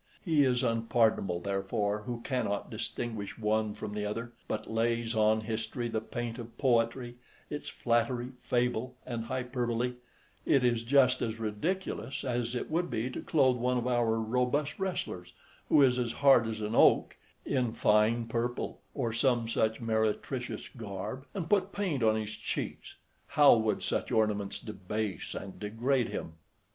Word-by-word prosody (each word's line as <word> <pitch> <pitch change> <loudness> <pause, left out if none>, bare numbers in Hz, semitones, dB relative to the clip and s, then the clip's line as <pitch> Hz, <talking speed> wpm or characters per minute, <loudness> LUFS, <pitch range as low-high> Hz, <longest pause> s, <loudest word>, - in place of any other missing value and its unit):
He 155 -5 +4
is 125 -1 +2
unpardonable, 115 -6 +2
therefore, 100 +2 -1
who 120 -1 -4
cannot 115 -6 -2
distinguish 110 -4 -4
one 110 -1 0
from 105 - -6
the 105 0 -2
other; 115 +3 -3 0.2
but 110 0 -3
lays 115 +1 0
on 110 0 +3
history 115 +2 -3
the 110 -1 -1
paint 120 +1 -5
of 115 0 -9
poetry, 120 -1 +1 0.3
its 150 0 -4
flattery, 120 +1 0
fable, 125 0 0
and 115 -2 -4
hyperbole: 125 -1 -1 0.5
it 135 -3 +3
is 120 -2 +2
just 130 +1 +4
as 110 0 -2
ridiculous 135 - -2
as 120 -2 -1
it 125 - -3
would 175 +2 0
be 115 +4 -2
to - - -5
clothe 130 -5 +3
one 125 +1 +1
of 120 - -1
our 120 -3 +2
robust 125 - 0
wrestlers, 175 - -3 0.4
who 145 - +6
is 125 -1 +4
as 120 -2 -1
hard 135 -5 +5
as 110 -1 -4
an 105 +1 -2
oak, - - +5 0.3
in 125 -4 +1
fine 110 +2 +3
purple, 120 +1 -2
or 120 -5 -1
some 120 -1 +2
such 110 -1 +1
meretricious 115 +3 -1
garb, 115 +4 -6
and 175 -4 -3
put 195 +1 +2
paint 180 -10 -1
on 110 -1 +4
his 110 0 -3
cheeks; - - -5 0.3
how 145 -2 +7
would 110 -1 0
such - - -1
ornaments 105 -2 +1
debase 105 -2 -4
and 95 -1 -7
degrade 115 +4 0
him! 80 - -5
115 Hz, 155 wpm, -31 LUFS, 110-125 Hz, 0.5 s, how